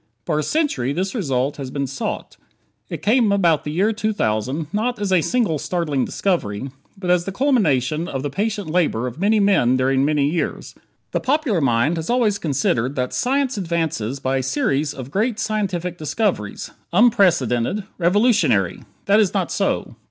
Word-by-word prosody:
For 150 - 0
a - - 0
century 150 - 0
this 190 +4 -2
result 135 - -1
had 135 -3 -6
been 140 -1 -1
sought. 135 0 -5 0.5
It - - -6
came, 225 0 +3
about 175 -6 +2
the 150 - -3
year 195 +8 +1
2000, 150 - -1
not 240 +4 0
as 205 -2 -2
a 185 -3 +4
single 210 - 0
startling 150 -7 -1
discovery, 135 - -2 0.3
but 180 -2 -1
as 175 -1 +2
the 195 - -3
culmination 170 - +1
of 135 -1 -4
the 145 - -3
patient 205 +2 -2
labor 155 -8 +1
of 125 +4 -6
many 210 +3 +3
men 185 -12 +3
during 130 +1 +2
many 145 -1 +2
years. 165 +3 -3 0.4
The - - 0
popular 260 - +1
mind 135 +5 +2
has 160 0 -4
always 230 -4 +2
considered 135 -3 0
that 125 -1 -2
science 265 -2 0
advances 160 - -2
by 135 0 0
a - - 0
series 135 +2 0
of 130 0 -8
"great 215 +5 0
scientific 190 -7 -2
discoveries"; 155 - -2 0.2
"unprecedented"; 180 - +3 0.2
"revolutionary." 210 +7 +2 0.2
That 205 +1 +4
is 205 -4 +2
not - - 0
so. - - -1
170 Hz, 165 wpm, -21 LUFS, 135-210 Hz, 0.5 s, a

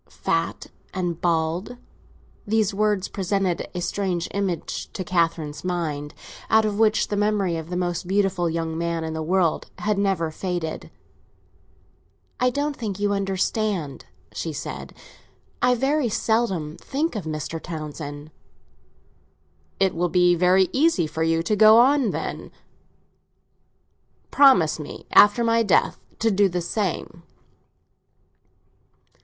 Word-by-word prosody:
"Fat - - -2 0.3
and 175 -3 -2
bald": 170 +7 -1 0.7
these 215 -1 +1
words 205 -1 +1
presented 190 -2 -1
a 180 - -2
strange 180 -2 -2
image 190 -5 -3
to 190 - -4
Catherine's 165 -4 -1
mind, 155 -5 -3 0.3
out 220 0 +4
of 210 -1 -2
which 220 -1 +3
the 205 - -1
memory 205 -4 +1
of 160 0 -6
the 180 - -3
most 175 0 -2
beautiful 190 -3 +1
young 165 0 -3
man 170 0 -2
in 160 0 -4
the 160 - -3
world 170 0 0
had 210 -1 -1
never 190 -5 0
faded. 175 -1 -4 1.5
"I 250 - +3
don't 285 +3 -2
think 205 -6 -5
you 205 0 +1
understand," 195 - -2 0.3
she 165 - -4
said. 145 - -7 0.7
"I 250 0 +4
very 270 +1 +1
seldom 195 -9 -1
think 295 +1 -2
of 205 - -4
Mr. 155 +1 -4
Townsend." 150 -2 -7 1.5
"It 195 -1 +2
will 175 +1 0
be 180 +1 +4
very 180 +2 +4
easy 280 - +3
for 160 +1 -5
you 165 0 +1
to 210 +5 0
go 215 +1 +7
on, 260 0 +4
then. - - -5 1.8
Promise 220 - +5
me, 150 - -8
after 205 +4 +6
my 230 0 +3
death, 205 -5 +2 0.2
to 225 0 +1
do 200 0 +3
the 180 0 -2
same." 175 -2 -3
185 Hz, 130 wpm, -23 LUFS, 165-210 Hz, 1.8 s, go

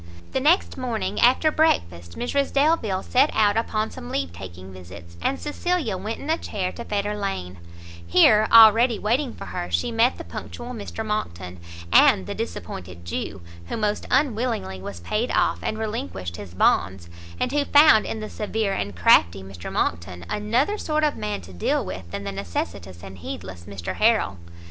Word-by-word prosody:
The - - 0
next 305 +1 +2
morning 240 -4 -2
after 260 +6 +4
breakfast, 85 - 0
Mrs 275 +3 -1
Delvile 275 - +1
set 270 +4 +3
out 205 -2 +3
upon 220 -1 -1
some 80 - -9
leave 90 -2 -2
taking 90 +1 -10
visits, 85 -2 -12
and 275 - -1
Cecilia 300 - -1
went 210 +5 -5
in - - -8
a 320 +1 +1
chair 185 -3 -3
to 235 - -8
Fetter 205 -1 -2
lane; 95 - -4 0.5
here, 215 - +5
already 225 +1 +7
waiting 245 +5 0
for - - -9
her, 90 - -5
she 85 - 0
met 230 +3 +2
the - - -7
punctual 240 +1 -8
Mr 220 -1 -6
Monckton, 90 - -4 0.3
and 95 - +6
the - - -4
disappointed 85 -1 -7
Jew, 85 +2 -4 0.3
who - - -4
most 210 -1 -1
unwillingly 230 - 0
was 95 -3 -8
paid 215 - -1
off, - - +1
and 215 - -3
relinquished 95 - -4
his 90 -4 -10
bonds; 90 0 +1 0.3
and - - 0
who 290 0 +1
found 290 -6 +6
in 220 - -4
the 215 - -5
severe 210 -1 -2
and 100 - -3
crafty 85 +2 +4
Mr 95 -2 -8
Monckton, 85 +1 -2
another 245 - 0
sort 310 0 -1
of 300 -1 +2
man 105 -2 -4
to 90 +1 -13
deal 90 - 0
with 90 -2 -7
than 100 - -5
the 100 - -4
necessitous 95 -1 -5
and 95 -1 -10
heedless 85 +1 -8
Mr 100 -4 -6
Harrel. 215 - +2
200 Hz, 175 wpm, -24 LUFS, -, 0.5 s, already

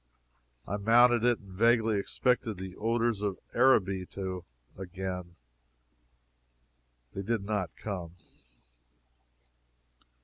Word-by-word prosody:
I 100 - -2
mounted 120 +3 +5
it, 120 -1 +3
and 100 -2 -16
vaguely 115 0 +3
expected 120 0 0
the 95 0 -7
odors 115 -1 0
of 100 -2 -2 0.2
Araby 95 -8 +3
a 90 -5 -7
gain. 90 -1 -6 1.8
They 95 - -4
did 110 +1 -1
not 100 -4 -2
come. 90 -5 -6
100 Hz, 95 wpm, -30 LUFS, 95-115 Hz, 1.8 s, mounted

